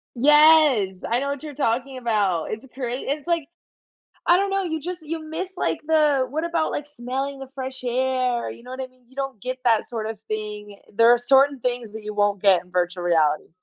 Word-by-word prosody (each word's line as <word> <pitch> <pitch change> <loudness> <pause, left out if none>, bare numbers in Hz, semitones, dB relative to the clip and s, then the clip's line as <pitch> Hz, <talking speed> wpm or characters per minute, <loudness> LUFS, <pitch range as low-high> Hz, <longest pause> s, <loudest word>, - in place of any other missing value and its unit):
Yes! 295 -8 +5
I 235 +2 +2
know 280 +1 -2
what 280 +1 -4
you're 300 -2 -7
talking 260 0 -1
about. 205 -9 0
It's 220 +5 -6
great 255 -1 -4
it's, 290 +2 -3
like 335 -4 0 0.8
I 345 - +6
don't 395 +1 0
know, 390 0 0
you 320 -3 -3
just 355 +2 -6
you 315 +1 -5
miss, 320 +5 -5
like, - - -1
the 300 -4 +3
what 310 +4 -2
about, 335 -2 0
like, 290 - -4
smelling 270 0 -4
the 270 - -8
fresh 260 -1 -6
air? 250 -1 0
You - - -11
know 250 - -12
what 260 +1 -6
I 260 - -3
mean? 255 -1 -28
You 255 - -23
don't 270 -4 -4
get 255 +4 -4
that 225 -3 +4
sort 225 -3 -5
of 220 -1 -6
thing. 210 -1 -5
There 230 +2 +6
are 240 - +6
certain 270 +3 +4
things 245 -3 -2
that 220 0 -8
you 210 0 -5
won't 205 -1 +1
get 195 -3 +5
in 180 - -23
virtual 180 0 -1
reality. 155 -3 +2
255 Hz, 220 wpm, -23 LUFS, 220-290 Hz, 0.8 s, I